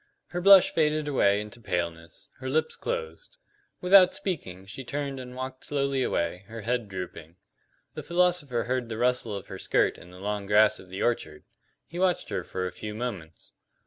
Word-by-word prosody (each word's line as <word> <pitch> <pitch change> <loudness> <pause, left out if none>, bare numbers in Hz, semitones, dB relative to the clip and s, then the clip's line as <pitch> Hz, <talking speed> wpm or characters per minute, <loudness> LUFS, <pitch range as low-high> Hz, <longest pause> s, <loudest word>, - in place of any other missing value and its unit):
Her 175 - -3
blush 195 0 +8
faded 155 -1 +1
away 100 -8 +3
into 105 +3 -10
paleness; 85 -4 -4
her 130 0 -4
lips 155 +4 0
closed. - - -5 0.4
Without 185 0 +7
speaking, 95 - -4
she 100 +7 -8
turned 140 +1 -4
and 125 0 -8
walked 130 0 -6
slowly 140 -2 0
away, 90 -4 -1
her 115 +1 -7
head 120 0 -1
drooping. 90 -3 -7 0.6
The - - -5
philosopher 175 -8 +1
heard 125 -1 -2
the 110 - -4
rustle 120 -3 +1
of 100 0 -6
her 95 -1 -8
skirt - - +1
in 90 - -14
the 90 - -13
long 100 0 -3
grass 105 +1 +5
of 95 - -14
the 95 - -4
orchard; 75 -10 -1 0.4
he 170 - -7
watched 185 -1 +1
her - - -2
for 95 0 -4
a 90 - -3
few 105 0 -7
moments. 100 -10 -6
120 Hz, 180 wpm, -27 LUFS, 95-145 Hz, 0.6 s, blush